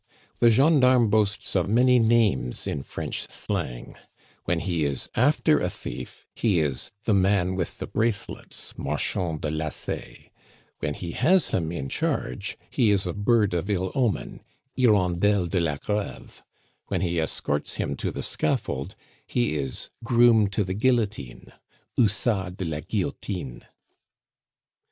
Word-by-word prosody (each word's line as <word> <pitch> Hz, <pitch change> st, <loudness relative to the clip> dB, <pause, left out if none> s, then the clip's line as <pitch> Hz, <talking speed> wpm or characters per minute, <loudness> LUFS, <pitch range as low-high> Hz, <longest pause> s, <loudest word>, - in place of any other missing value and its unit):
The 120 Hz, -, +6 dB
gendarme 130 Hz, -3 st, +5 dB
boasts 105 Hz, -2 st, +1 dB
of 95 Hz, 0 st, +2 dB
many 125 Hz, +3 st, +5 dB
names 110 Hz, -, +2 dB
in 70 Hz, -, -2 dB
French -, -, -5 dB
slang; -, -, -4 dB, 0.5 s
when 85 Hz, -1 st, 0 dB
he 85 Hz, -5 st, 0 dB
is 70 Hz, -3 st, -1 dB
after -, -, +3 dB
a -, -, 0 dB
thief, -, -, -7 dB
he 105 Hz, -7 st, +2 dB
is 70 Hz, -5 st, -1 dB
"the 110 Hz, -, +2 dB
man 95 Hz, -1 st, +3 dB
with 95 Hz, -, -3 dB
the -, -, -4 dB
bracelets" 110 Hz, -3 st, -3 dB
(marchand 80 Hz, +3 st, -1 dB
de 75 Hz, -, -2 dB
lacets); 80 Hz, 0 st, -5 dB, 0.5 s
when 75 Hz, 0 st, -2 dB
he 85 Hz, -2 st, -5 dB
has 185 Hz, -, +3 dB
him 80 Hz, -2 st, -1 dB
in 70 Hz, -6 st, -4 dB
charge, -, -, -2 dB
he 115 Hz, -4 st, +3 dB
is 100 Hz, -1 st, +2 dB
a 90 Hz, -, -2 dB
bird 105 Hz, -1 st, +2 dB
of 90 Hz, +3 st, -2 dB
ill 95 Hz, -2 st, 0 dB
omen 120 Hz, -8 st, -1 dB, 0.3 s
(hirondelle 100 Hz, -4 st, +3 dB
de 90 Hz, +2 st, 0 dB
la 80 Hz, -4 st, 0 dB
Greve); 105 Hz, +6 st, -4 dB, 0.5 s
when -, -, -1 dB
he 85 Hz, -2 st, 0 dB
escorts 75 Hz, -2 st, -2 dB
him -, -, -2 dB
to -, -, -2 dB
the -, -, -5 dB
scaffold, 65 Hz, -, -1 dB, 0.3 s
he 120 Hz, -9 st, +1 dB
is 70 Hz, -4 st, -4 dB
"groom 115 Hz, -3 st, +5 dB
to 100 Hz, +2 st, 0 dB
the 95 Hz, 0 st, -3 dB
guillotine" 105 Hz, -, -1 dB, 0.4 s
(hussard 100 Hz, -4 st, +1 dB
de 95 Hz, -, -3 dB
la 80 Hz, -2 st, -3 dB
guillotine). 70 Hz, -, -4 dB
95 Hz, 140 wpm, -25 LUFS, 80-110 Hz, 0.5 s, The